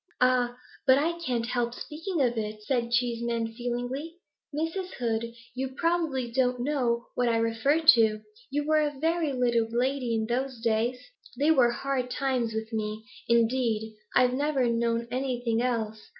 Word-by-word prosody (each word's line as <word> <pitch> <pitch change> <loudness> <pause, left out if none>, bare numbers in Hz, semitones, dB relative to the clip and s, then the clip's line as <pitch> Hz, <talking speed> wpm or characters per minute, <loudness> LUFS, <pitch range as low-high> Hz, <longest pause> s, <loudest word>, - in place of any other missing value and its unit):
'Ah, 250 -1 +2 0.3
but 260 0 +7
I 335 +4 0
can't 245 -8 -1
help 240 0 -1
speaking 325 +2 -4
of 240 -1 +1
it,' 215 -1 -4
said 235 0 0
Cheeseman, 235 -1 0
feelingly. 245 +6 -4 0.4
'Miss 320 +2 -2 0.2
Hood, 230 -1 -1 0.2
you 260 +1 -4
probably 320 -8 0
don't 250 0 +1
know 245 -3 0
what 245 -1 +1
I 230 - +2
refer 230 +7 +2
to; 225 -9 +5 0.3
you 290 +1 -1
were 310 0 +3
a 295 -2 -1
very 325 0 +1
little 240 -3 +1
lady 245 0 0
in 220 0 0
those 250 +2 -2
days. 230 +2 +1 0.4
They 295 +3 +4
were 260 -6 +5
hard 255 +1 -2
times 255 -3 0
with 220 +1 -4
me; 215 0 -3 0.2
indeed, 230 -2 +1 0.2
I've 250 -1 +5
never 280 -1 +1
known 235 0 0
anything 245 -3 -1
else. 220 -3 -1
245 Hz, 155 wpm, -28 LUFS, 230-270 Hz, 0.4 s, but